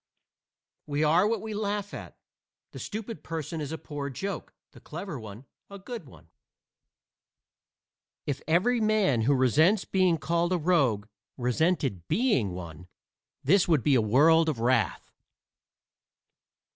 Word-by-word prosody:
We 145 Hz, +1 st, 0 dB
are 165 Hz, +6 st, +4 dB
what 220 Hz, -2 st, -1 dB
we 220 Hz, -1 st, -5 dB
laugh 205 Hz, -1 st, -3 dB
at. -, -, -9 dB, 0.5 s
The -, -, -9 dB
stupid 220 Hz, -5 st, -6 dB
person 160 Hz, 0 st, -5 dB
is 145 Hz, 0 st, -5 dB
a 160 Hz, -, -3 dB
poor 145 Hz, -2 st, -6 dB
joke, 195 Hz, +9 st, -5 dB, 0.2 s
the -, -, -15 dB
clever, 170 Hz, -, -7 dB, 0.5 s
a 200 Hz, -, -9 dB
good 205 Hz, -, -8 dB
one. 85 Hz, -9 st, -17 dB, 2.0 s
If 140 Hz, -1 st, -3 dB
every 220 Hz, +9 st, +2 dB
man 210 Hz, -, +2 dB
who 140 Hz, +5 st, +3 dB
resents 155 Hz, -, +3 dB
being 185 Hz, -3 st, +2 dB
called 170 Hz, +3 st, 0 dB
a -, -, +2 dB
rogue 140 Hz, -, +2 dB, 0.3 s
resented 125 Hz, -, 0 dB
being 215 Hz, -, +1 dB
one 90 Hz, -1 st, -8 dB, 0.6 s
this 180 Hz, +7 st, +4 dB
would 155 Hz, -8 st, +2 dB
be 145 Hz, -, +3 dB
a 125 Hz, -, +4 dB
world 160 Hz, +9 st, +4 dB
of 140 Hz, -7 st, -3 dB
wrath. 115 Hz, -5 st, 0 dB
160 Hz, 130 wpm, -28 LUFS, 130-195 Hz, 2.0 s, are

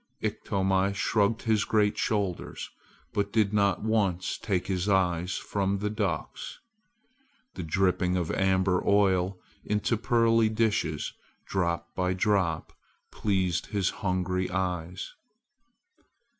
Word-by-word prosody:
Iktomi 95 Hz, 0 st, 0 dB
shrugged 105 Hz, +2 st, +1 dB
his 110 Hz, -2 st, +2 dB
great 105 Hz, -1 st, +2 dB
shoulders, 100 Hz, -5 st, -2 dB, 0.4 s
but 100 Hz, 0 st, 0 dB
did 105 Hz, -2 st, +2 dB
not 100 Hz, -2 st, +2 dB
once 100 Hz, -5 st, 0 dB
take 95 Hz, -5 st, -1 dB
his 95 Hz, +1 st, -1 dB
eyes 90 Hz, -2 st, +1 dB
from 100 Hz, -1 st, -1 dB
the 105 Hz, +1 st, -2 dB
ducks. 105 Hz, -5 st, -3 dB, 1.0 s
The -, -, -6 dB
dripping 90 Hz, +2 st, +1 dB
of 85 Hz, -3 st, -1 dB
amber 95 Hz, -1 st, +2 dB
oil 95 Hz, -2 st, +3 dB, 0.3 s
into 105 Hz, +2 st, 0 dB
pearly 115 Hz, -1 st, +3 dB
dishes, 110 Hz, -9 st, 0 dB, 0.3 s
drop 85 Hz, -2 st, -1 dB
by 90 Hz, 0 st, 0 dB
drop, 95 Hz, -5 st, 0 dB, 0.4 s
pleased 95 Hz, -4 st, 0 dB
his 100 Hz, -3 st, 0 dB
hungry 90 Hz, -1 st, -1 dB
eyes. 90 Hz, 0 st, -3 dB
95 Hz, 110 wpm, -28 LUFS, 90-105 Hz, 1.0 s, oil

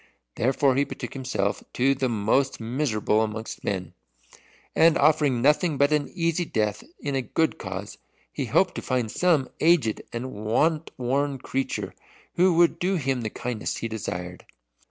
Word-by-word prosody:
Therefore 130 Hz, +2 st, +2 dB
he 140 Hz, -, +4 dB
betook -, -, -7 dB
himself 125 Hz, -7 st, -2 dB
to 135 Hz, +2 st, +3 dB
the 130 Hz, -1 st, -1 dB
most 115 Hz, +5 st, +1 dB
miserable 110 Hz, -3 st, 0 dB
amongst 110 Hz, 0 st, -4 dB
men, 95 Hz, -2 st, -3 dB, 0.8 s
and 165 Hz, 0 st, +5 dB
offering 145 Hz, -5 st, +3 dB
nothing 150 Hz, +2 st, +3 dB
but 140 Hz, +2 st, +3 dB
an 150 Hz, -1 st, +1 dB
easy 170 Hz, 0 st, +1 dB
death 105 Hz, -, -1 dB, 0.2 s
in 140 Hz, -, -2 dB
a 135 Hz, -, +1 dB
good 160 Hz, +7 st, 0 dB
cause, 95 Hz, +1 st, -6 dB, 0.3 s
he -, -, -2 dB
hoped -, -, +2 dB
to -, -, -5 dB
find 125 Hz, -4 st, -1 dB
some 165 Hz, -7 st, +2 dB
aged 155 Hz, -10 st, +3 dB
and 125 Hz, +2 st, -4 dB
want 150 Hz, +10 st, +1 dB
worn 135 Hz, +3 st, 0 dB
creature 135 Hz, +1 st, -3 dB, 0.4 s
who 180 Hz, 0 st, +4 dB
would 170 Hz, 0 st, +4 dB
do 190 Hz, +2 st, +1 dB
him 135 Hz, -6 st, -1 dB
the 110 Hz, -, -2 dB
kindness 120 Hz, 0 st, -4 dB
he 115 Hz, -, -3 dB
desired. 90 Hz, -5 st, -6 dB
130 Hz, 155 wpm, -25 LUFS, 110-150 Hz, 0.8 s, and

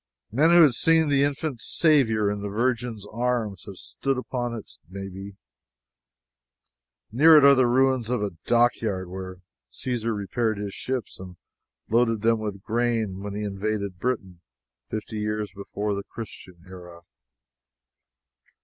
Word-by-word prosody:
Men 145 Hz, +9 st, +4 dB
who 170 Hz, 0 st, +8 dB
had 145 Hz, -5 st, +5 dB
seen 160 Hz, +4 st, +3 dB
the 140 Hz, -1 st, +3 dB
infant 140 Hz, -3 st, -1 dB
Saviour 115 Hz, -10 st, +2 dB
in 105 Hz, 0 st, -4 dB
the 100 Hz, -, -4 dB
Virgin's 115 Hz, -1 st, -1 dB
arms 115 Hz, -6 st, -1 dB
have 100 Hz, -2 st, -9 dB
stood 135 Hz, +6 st, -3 dB
upon 120 Hz, -2 st, -3 dB
it, 110 Hz, -, -9 dB
maybe. 95 Hz, +1 st, -8 dB, 1.8 s
Near 155 Hz, +7 st, +7 dB
it 145 Hz, -, +7 dB
are 140 Hz, -, +9 dB
the 130 Hz, -2 st, +4 dB
ruins 130 Hz, -1 st, +2 dB
of 125 Hz, -4 st, 0 dB
a 100 Hz, -, -2 dB
dockyard 110 Hz, -6 st, +1 dB
where 95 Hz, -1 st, -7 dB, 0.3 s
Caesar 115 Hz, -3 st, -3 dB
repaired 110 Hz, +2 st, -1 dB
his 100 Hz, -1 st, -5 dB
ships 130 Hz, -3 st, -4 dB
and 90 Hz, -1 st, -9 dB, 0.5 s
loaded 115 Hz, -2 st, +2 dB
them 115 Hz, 0 st, +3 dB
with 100 Hz, -3 st, -5 dB
grain 115 Hz, -4 st, -1 dB
when 100 Hz, 0 st, -5 dB
he 105 Hz, -, -3 dB
invaded 100 Hz, -1 st, -3 dB
Britain, 95 Hz, -7 st, -3 dB, 0.5 s
fifty 110 Hz, 0 st, -5 dB
years 105 Hz, -1 st, -2 dB
before 100 Hz, +1 st, -3 dB
the 100 Hz, -, -3 dB
Christian 95 Hz, -5 st, -10 dB
era. 90 Hz, -2 st, -12 dB
110 Hz, 140 wpm, -25 LUFS, 100-125 Hz, 1.8 s, are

